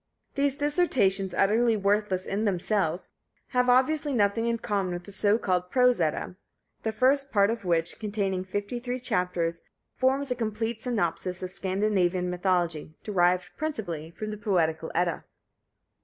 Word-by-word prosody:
These 280 -1 +1
dissertations, 265 - +1
utterly 225 +3 +3
worthless 200 -2 +1
in 205 +2 -2
themselves, 190 -2 0 0.4
have 250 -1 +2
obviously 285 +4 +3
nothing 225 0 +2
in 235 0 +1
common 200 -5 -1
with 175 0 -5
the 200 - -11
so 205 +2 +2
called 180 -4 -1
"Prose 250 -2 +3
Edda," 160 +3 -1 0.4
the 220 - -1
first 270 +4 +2
part 200 -1 +4
of 230 -4 -5
which, 170 -1 0
containing 200 -3 -1
fifty 205 +5 -4
three 250 +1 -4
chapters, 180 -7 -1 0.3
forms 265 +1 +1
a - - +1
complete 225 0 -3
synopsis 185 -6 -2
of 185 - -4
Scandinavian 185 -2 0
mythology, 175 -4 0
derived 180 -3 +1
principally 195 - -4
from 215 +6 -6
the 210 - -5
Poetical 165 -6 0
Edda. 175 -2 0
200 Hz, 145 wpm, -27 LUFS, 180-235 Hz, 0.4 s, part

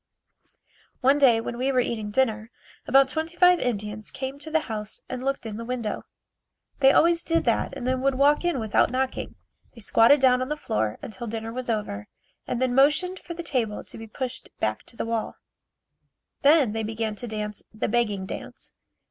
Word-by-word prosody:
One 275 +2 +4
day 245 -5 +6
when 235 +1 -5
we 265 +2 +1
were 255 - +2
eating 220 -4 -2
dinner, 220 -1 0 0.4
about 270 0 +6
twenty 320 +4 -4
five 360 0 +6
Indians 210 -3 -3
came 265 +1 -5
to 315 - -7
the 320 0 +2
house 215 -5 -6
and 255 0 -5
looked 275 -2 -2
in 215 -2 -5
the 230 - -5
window. 235 -3 -4 0.7
They 270 -1 +7
always 335 +2 +4
did 330 0 +1
that - - 0
and - - -6
then 255 0 0
would 275 0 +2
walk 285 +4 +4
in 350 -6 0
without 220 -2 +2
knocking. 260 +1 -2 0.4
They 230 - -12
squatted 230 +7 +5
down 255 -1 +4
on 255 - -2
the 300 - -2
floor 110 - -1
until 220 +3 -6
dinner 225 +1 -5
was 255 0 -4
over 210 - -2 0.4
and 245 - -2
then 255 -1 +1
motioned 300 +8 +3
for 340 - -8
the 340 - -6
table 230 -9 -1
to - - -10
be 225 - -8
pushed 255 +3 -5
back 110 0 -1
to 230 - -12
the - - -2
wall. 230 -1 -2 1.1
Then 285 -5 +5
they 225 +1 -2
began 220 0 -2
to 245 - -5
dance 210 -2 -4
the 215 - -2
begging 210 -4 0
dance. - - -8
245 Hz, 195 wpm, -25 LUFS, 220-275 Hz, 1.1 s, They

